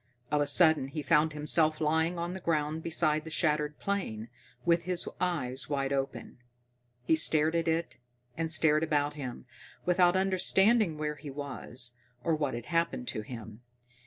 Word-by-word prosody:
Of 150 -1 +2
a 145 - +1
sudden 155 -2 +4
he 150 +2 -5
found 155 +2 +3
himself 155 +1 +2
lying 160 +3 +1
on 170 +1 -3
the 190 - -6
ground 155 -2 -1
beside 155 -2 +1
the 160 - -8
shattered 150 -2 0
plane, 120 - -3 0.4
with 170 0 +3
his 180 -1 -1
eyes 135 -8 -2
wide 140 -1 -1
open. 135 -2 -4 0.6
He 125 - +2
stared 155 0 +4
at 165 0 0
it, 165 +1 -1 0.4
and 160 -1 -2
stared 155 -1 +3
about 150 -2 0
him, 130 -4 -7 0.4
without 180 0 +4
understanding 190 0 +3
where 150 -1 -3
he 145 +1 -9
was, 130 -3 -7 0.3
or 165 - +1
what 145 -5 -2
had 120 -1 -6
happened 170 - -1
to 110 - -3
him. 110 -1 -9
155 Hz, 160 wpm, -30 LUFS, 145-170 Hz, 0.6 s, sudden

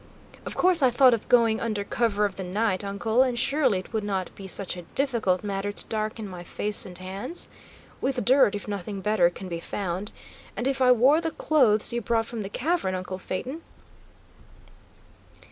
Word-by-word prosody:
"Of - - -5
course 360 -3 +4
I 260 - +5
thought 255 +1 +5
of 225 - -3
going 230 -3 +4
under 215 -3 -2
cover 210 -1 0
of 200 -2 -3
the 190 - -5
night, 195 +1 0
uncle, 200 +4 +1
and 255 -2 +1
surely 265 -3 +2
it 185 +5 -8
would 220 -1 -1
not 195 -3 -3
be 195 - -9
such 190 0 -1
a 180 - -7
difficult 220 -2 0
matter 200 0 -2
to - - -6
darken 215 0 -3
my 180 -2 -8
face 210 +3 -1
and 180 -1 -8
hands? 195 - -4 0.5
With 260 -2 -1
dirt, 255 -5 +5
if 205 - -6
nothing 200 -1 -5
better 190 -3 +3
can 185 +2 -9
be 170 -2 -4
found. 190 +3 -4 0.5
And 245 - -1
if 270 -1 -1
I 250 -1 +6
wore 260 +7 +5
the 330 - -1
clothes 245 -10 +3
you 240 - -1
brought 225 +1 0
from 230 -1 -5
the 195 - -5
cavern, 270 - -1
uncle 185 0 -5
Phaeton?" 255 - -5
215 Hz, 190 wpm, -26 LUFS, 195-250 Hz, 0.5 s, I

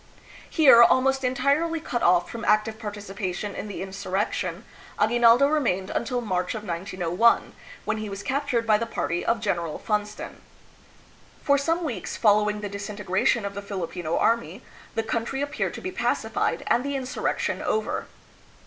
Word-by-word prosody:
Here, 275 -7 +7
almost 265 +3 +4
entirely 280 +6 +1
cut 245 -6 -3
off 175 0 +4
from 230 0 -7
active 215 +1 +2
participation 205 -2 -5
in - - -6
the 200 - -5
insurrection, 190 -1 -3 0.3
Aguinaldo 235 +4 +5
remained 235 -11 0
until 245 +1 -1
March 185 -3 -2
of 215 - -5
1901, 185 +3 +1 0.3
when - - -1
he 215 -1 -5
was 195 0 -6
captured 265 -4 -1
by 215 -1 +4
the 230 - -2
party 175 -6 -2
of 230 0 +1
General 170 -7 -2
Funston. 210 -1 -3 1.0
For 280 0 +3
some 330 +5 0
weeks 230 - -4
following 210 -1 +3
the 205 - -3
disintegration 200 +2 -1
of 200 - -4
the 200 - -5
Filipino 175 -4 -3
army, 225 -2 0 0.3
the 225 - 0
country 230 +4 -2
appeared 285 - -2
to - - -7
be 370 - -4
pacified - - -1
and 240 - +2
the 280 0 -2
insurrection 265 0 -2
over. 440 - -1
215 Hz, 150 wpm, -25 LUFS, 195-250 Hz, 1.0 s, Here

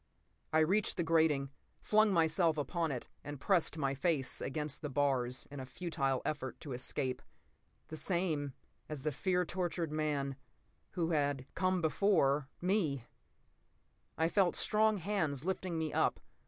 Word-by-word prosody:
I 160 0 +4
reached 190 +7 +2
the 175 - +1
grating, 160 -4 +2 0.3
flung 215 0 +4
myself 165 -1 +3
upon 160 +3 -1
it 125 -3 -4 0.2
and 145 -1 -6
pressed 175 -1 +2
my 140 -3 0
face 140 -1 0
against 150 +1 -3
the 150 - -3
bars 130 -3 0
in 145 - -6
a 130 - -5
futile 135 -6 -1
effort 135 -4 -3
to 145 - -7
escape. 125 +1 -2 0.7
The 155 - -6
same—as 150 -4 -2
the 150 - 0
fear 180 +5 +1
tortured 175 -2 -2
man—who 150 +3 -3
had—come 145 +5 0
before—me. 155 - +2 1.1
I 160 - +3
felt 185 0 +2
strong 215 0 +3
hands 160 -7 -1
lifting 185 -2 -2
me 160 -1 -2
up. - - +2
155 Hz, 130 wpm, -34 LUFS, 140-175 Hz, 1.1 s, I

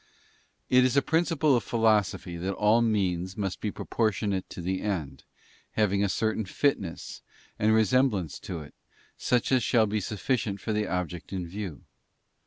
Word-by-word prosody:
It 125 0 +5
is 130 +2 +2
a - - +6
principle 160 -4 +2
of 120 - +1
philosophy 105 -5 +1
that 95 +3 -3
all 105 +3 +4
means 95 -5 0
must 95 -3 -3
be 105 - -1
proportionate 105 -3 -1
to - - -8
the 95 +2 -2
end, 90 -9 -3 0.5
having 100 -2 +2
a 100 - +1
certain 110 +2 0
fitness, 100 - -2 0.4
and 110 +1 +3
resem 110 +5 +4
blance 90 - -4
to 85 -3 -5
it, 75 - -12 0.4
such 125 0 0
as 130 -2 +4
shall 115 -2 +3
be 105 +1 -1
sufficient 105 +1 -2
for 110 - -3
the 105 0 0
object 90 -2 -4
in 95 -2 -3
view. 95 -4 -6
105 Hz, 165 wpm, -28 LUFS, 95-115 Hz, 0.5 s, a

